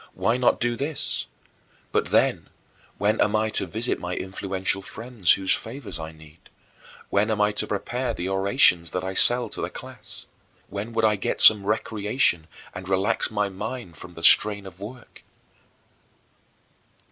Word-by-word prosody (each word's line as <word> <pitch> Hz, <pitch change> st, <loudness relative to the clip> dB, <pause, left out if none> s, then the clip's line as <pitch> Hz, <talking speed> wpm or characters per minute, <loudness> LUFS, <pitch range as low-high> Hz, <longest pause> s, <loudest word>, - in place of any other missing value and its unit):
Why 115 Hz, -, +1 dB
not 125 Hz, -1 st, +2 dB
do 120 Hz, 0 st, 0 dB
this? 145 Hz, +4 st, -2 dB, 0.6 s
But, -, -, 0 dB
then, -, -, +1 dB, 0.5 s
when 105 Hz, +2 st, +1 dB
am 105 Hz, +1 st, +2 dB
I 110 Hz, 0 st, +1 dB
to 95 Hz, -, 0 dB
visit 110 Hz, +7 st, -2 dB
my 90 Hz, 0 st, -4 dB
influential 95 Hz, 0 st, -3 dB
friends, 115 Hz, -1 st, +1 dB
whose 95 Hz, -1 st, 0 dB
favors 110 Hz, -, -6 dB
I 80 Hz, 0 st, -6 dB
need? 80 Hz, 0 st, -18 dB, 0.6 s
When 105 Hz, +2 st, +2 dB
am 110 Hz, -1 st, -1 dB
I 105 Hz, 0 st, +3 dB
to 105 Hz, -, -2 dB
prepare 120 Hz, +5 st, -3 dB
the 90 Hz, -5 st, -4 dB
orations 95 Hz, -, +3 dB
that 90 Hz, -, -2 dB
I 95 Hz, 0 st, -4 dB
sell 120 Hz, +5 st, +5 dB
to -, -, -6 dB
the -, -, -3 dB
class? -, -, -9 dB, 0.4 s
When 105 Hz, +3 st, -5 dB
would 115 Hz, -1 st, +1 dB
I 105 Hz, -1 st, +2 dB
get -, -, -3 dB
some 105 Hz, -2 st, +7 dB
recreation 105 Hz, -, 0 dB, 0.3 s
and 90 Hz, +1 st, -8 dB
relax 95 Hz, +4 st, 0 dB
my 105 Hz, -1 st, -1 dB
mind 100 Hz, -1 st, -7 dB
from 90 Hz, +3 st, -9 dB
the 80 Hz, -, -8 dB
strain 100 Hz, +1 st, +6 dB
of 95 Hz, -2 st, -12 dB
work? 120 Hz, +4 st, -11 dB
105 Hz, 160 wpm, -24 LUFS, 95-115 Hz, 0.6 s, some